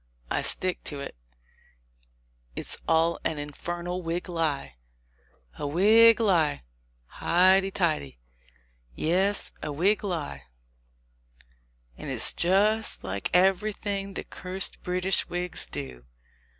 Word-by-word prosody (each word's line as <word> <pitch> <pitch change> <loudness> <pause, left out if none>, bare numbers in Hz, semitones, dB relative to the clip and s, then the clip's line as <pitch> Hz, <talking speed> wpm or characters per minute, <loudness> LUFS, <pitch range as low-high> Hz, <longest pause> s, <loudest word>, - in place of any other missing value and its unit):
I - - +1
stick 185 -1 +2
to 145 - -2
it, 140 - -7 1.4
it's - - -6
all 165 +1 +2
an 160 - -1
infernal 175 +5 -5
Whig 170 +2 -4
lie!" 155 - -2 0.8
"A 145 - -2
Whig 220 +9 +6
lie! 170 - +2 0.4
Highty 190 - +3
tighty 155 - -1 0.4
!" - - -36 0.2
"Yes, 195 +3 +1
a - - -4
Whig 190 +10 +1
lie; 150 - -4 1.5
and - - -6
it's - - +2
just 210 +5 +2
like 95 +1 -4
everything 195 +1 +1
the - - -4
cursed 185 +1 -4
British 180 +1 0
Whigs 175 0 -2
do. 65 -4 -7
175 Hz, 110 wpm, -27 LUFS, 145-195 Hz, 1.5 s, Whig